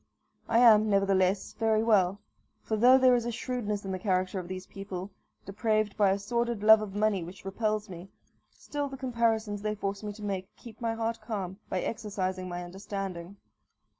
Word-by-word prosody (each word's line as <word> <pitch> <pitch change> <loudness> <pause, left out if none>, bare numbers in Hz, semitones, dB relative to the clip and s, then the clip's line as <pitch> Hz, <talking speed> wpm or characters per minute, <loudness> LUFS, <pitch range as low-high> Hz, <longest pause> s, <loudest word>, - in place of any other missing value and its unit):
I 230 - +3
am, 220 -3 +7
nevertheless, 195 -1 +2
very 220 -1 +1
well; 200 -4 +3 0.4
for 220 - -1
though 250 +4 +7
there 255 -1 +5
is 240 -1 +1
a - - -1
shrewdness 220 -4 -3
in 190 - -3
the 185 - -3
character 185 0 0
of 180 - -7
these 185 0 -6
people, 195 -1 -7 0.3
depraved 215 0 0
by 205 -2 +4
a 195 - +2
sordid 235 +1 -2
love 220 0 +8
of 205 -2 -6
money 205 -3 +1
which 185 +4 -11
repels 215 +2 -1
me, 180 0 -10 0.4
still 290 -1 -5
the 270 - -8
comparisons 230 -5 0
they 215 0 -2
force 200 -1 -3
me 210 -1 -4
to 210 +1 -11
make 190 -2 -3
keep 230 -1 -13
my 230 -1 -1
heart 225 0 -2
calm 195 -4 -5
by 185 - -1
exercising 185 -4 -3
my 175 0 -4
understanding. 190 0 -6
205 Hz, 185 wpm, -29 LUFS, 190-225 Hz, 0.4 s, love